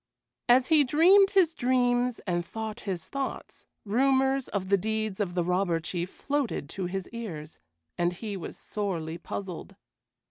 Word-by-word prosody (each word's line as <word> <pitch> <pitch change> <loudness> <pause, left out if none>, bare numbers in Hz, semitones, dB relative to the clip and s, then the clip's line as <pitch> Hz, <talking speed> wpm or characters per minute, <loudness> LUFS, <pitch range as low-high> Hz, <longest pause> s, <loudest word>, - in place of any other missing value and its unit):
As 250 +1 +5
he 310 -2 +6
dreamed 360 +9 +6
his 370 -5 +3
dreams 245 -2 +2
and 175 -3 0
thought 220 +4 -6
his 175 -4 -3
thoughts, 275 -1 -5 0.2
rumors 265 +4 +2
of 190 -2 -3
the 200 - +6
deeds 220 0 -2
of 185 -4 -2
the 175 - +2
Robber 180 -1 +1
Chief 175 +2 -3
floated 280 - -2
to 190 -2 -3
his 190 0 -4
ears, 170 -10 -7 0.4
and 175 0 +2
he 205 +2 -5
was 180 - -7
sorely 170 -6 -3
puzzled. 185 0 -6
215 Hz, 150 wpm, -28 LUFS, 180-260 Hz, 0.4 s, he